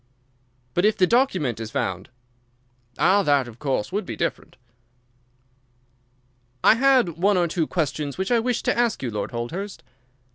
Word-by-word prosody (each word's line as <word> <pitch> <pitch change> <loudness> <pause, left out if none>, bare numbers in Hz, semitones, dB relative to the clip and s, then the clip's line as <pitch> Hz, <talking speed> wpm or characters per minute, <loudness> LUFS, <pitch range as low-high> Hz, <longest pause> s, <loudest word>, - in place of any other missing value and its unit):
"But 175 - +1
if 215 +1 +3
the 185 - +5
document 185 - +1
is 110 -1 -5
found?" 95 -1 -3 0.9
"Ah, 195 +3 +4
that, 145 -7 +2
of 115 -1 -12
course, 135 -7 -2
would 205 +3 -1
be - - -6
different." - - -4 2.1
"I - - +7
had 245 - +2
one 200 +2 +3
or 175 -1 +2
two 165 -1 -1
questions 150 -4 -2
which 190 +5 -2
I 240 - +4
wished 245 +1 -1
to - - +2
ask 235 - 0
you, 120 - -2
Lord 105 -2 -3
Holdhurst." 170 - -5
175 Hz, 155 wpm, -23 LUFS, 130-210 Hz, 2.1 s, I